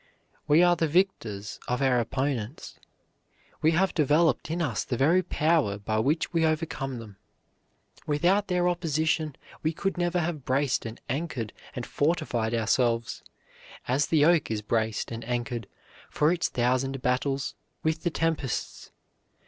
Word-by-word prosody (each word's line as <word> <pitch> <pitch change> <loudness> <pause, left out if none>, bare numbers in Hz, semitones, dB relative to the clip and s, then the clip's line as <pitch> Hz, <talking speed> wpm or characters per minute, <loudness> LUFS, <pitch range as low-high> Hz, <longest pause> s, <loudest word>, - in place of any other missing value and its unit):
We 155 +4 +6
are 175 0 +5
the 165 -1 +1
victors 115 - -1
of 125 - 0
our 130 -3 +3
opponents. 130 0 -3 0.8
They 155 - +4
have 175 +3 +2
developed 155 +1 +2
in 165 +2 -2
us 145 -10 -1
the 125 - -3
very 165 +8 +4
power 155 - +1
by 110 +1 -1
which 150 +9 0
we 165 -1 +2
overcome 155 -5 -1
them. 105 -4 -10 0.9
Without 180 +7 +2
their 180 -1 +1
opposition 160 -3 0 0.3
we 160 +1 0
could 195 +2 -2
never 175 0 +1
have 160 -4 -2
braced 130 -2 0
and 115 - -8
anchored 135 -5 -3 0.2
and 125 - -4
fortified 145 -8 0
ourselves, 115 0 +1 0.7
as 135 +4 +2
the 150 -3 +4
oak 170 -2 +3
is 110 -1 -2
braced 110 +1 -1
and 115 0 -5
anchored 120 -2 -3 0.4
for 150 +3 +2
its 170 - 0
thousand 130 +2 0
battles 135 +2 0 0.3
with 160 0 0
the 175 - 0
tempests. 160 -6 -2
145 Hz, 145 wpm, -27 LUFS, 120-165 Hz, 0.9 s, We